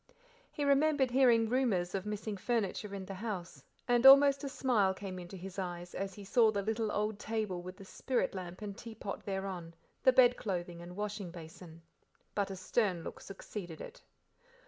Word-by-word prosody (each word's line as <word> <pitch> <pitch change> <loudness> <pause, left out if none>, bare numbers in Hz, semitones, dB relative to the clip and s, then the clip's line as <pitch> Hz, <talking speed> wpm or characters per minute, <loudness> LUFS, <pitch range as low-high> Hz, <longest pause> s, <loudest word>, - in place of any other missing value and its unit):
He 290 - -2
remembered 280 -2 +3
hearing 240 -3 +5
rumours 220 -8 +1
of 195 +1 -3
missing 210 0 -3
furniture 205 -1 -2
in 190 -1 -6
the 195 - -6
house, 185 - -5 0.2
and 245 -1 +3
almost 275 +1 +8
a 280 - -2
smile 220 -9 +2
came 185 -2 -6
into 180 +2 -8
his 190 +2 -7
eyes 175 -1 -5
as 195 -1 -4
he 205 - -9
saw 225 +3 +4
the 200 -2 -1
little 220 0 -1
old 210 0 -1
table 215 -6 -2
with 185 +1 -9
the 195 - -11
spirit 255 +6 -1
lamp 185 +1 -7
and 200 -1 -5
teapot 220 -3 -7
thereon, 190 -4 -4 0.3
the 260 - +6
bed 250 -1 +6
clothing 175 -4 -4
and 175 +1 -9
washing 205 -2 -4
basin. 165 0 -11 0.5
But 200 -1 0
a 195 - -5
stern 185 -2 0
look - - -7
succeeded 190 -3 -8
it. - - -9
200 Hz, 180 wpm, -33 LUFS, 185-230 Hz, 0.5 s, almost